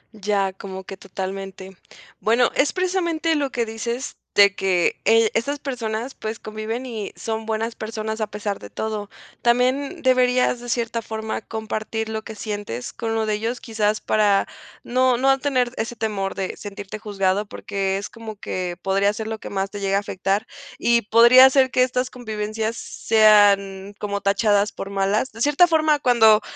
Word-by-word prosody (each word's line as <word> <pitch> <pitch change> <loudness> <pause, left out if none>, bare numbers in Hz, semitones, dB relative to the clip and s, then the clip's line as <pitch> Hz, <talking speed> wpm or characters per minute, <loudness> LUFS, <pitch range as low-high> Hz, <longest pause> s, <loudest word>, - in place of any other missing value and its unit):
Ya, 200 -2 0
como 190 0 -8
que 195 - -8
totalmente. 190 0 -7 0.4
Bueno, 235 +2 +3
es 285 - +2
precisamente 345 -3 0
lo 290 -3 0
que 235 -1 -1
dices 235 +3 -4 0.2
de 200 -1 +6
que, 185 -3 +1
eh, 225 0 +5
estas 280 +5 -1
personas, 245 -2 -4
pues, 220 0 -5
conviven 215 +4 -5
y 220 -4 -5
son 220 0 -4
buenas 225 +1 -2
personas 220 0 -4
a 215 - 0
pesar 205 -1 -4
de - - -11
todo. 215 -2 -4 0.3
También 255 +4 +1
deberías, 250 -1 +3
de 245 0 -9
cierta 230 -1 -1
forma, 220 0 -4
compartir 220 0 -4
lo 220 0 -4
que 220 - -8
sientes 205 - -5
con 230 -1 -4
uno 225 -1 0
de 215 - +1
ellos, 230 +4 -3
quizás, 215 -2 -1
para 205 -2 +2 0.4
no 255 0 +2
no 270 +2 +3
tener 260 -3 0
ese 235 +2 -3
temor 205 -4 -2
de 190 -1 -4
sentirte 200 0 -7
juzgado, 200 -1 0
porque 195 -1 -3
es 200 - -6
como 225 -2 -9
que 180 -3 -4
podría 195 +1 +2
ser 220 0 -5
lo 220 0 -3
que - - -8
más 195 0 -1
te 205 - -7
llegue 195 -1 -1
a 200 - +4
afectar. 200 +2 -2 0.3
Y 235 0 +3
podría 235 +5 +8
ser 265 -1 +4
que 255 0 +3
estas 255 0 -1
convivencias 220 -1 -4
sean 205 -2 +3
como 200 -1 -2
tachadas 205 +1 +2
por 195 - -7
malas. 200 +5 0
De 225 - -10
cierta 295 +6 +5
forma, 310 -3 +3
cuando 225 -5 +5
220 Hz, 170 wpm, -22 LUFS, 200-240 Hz, 0.4 s, podría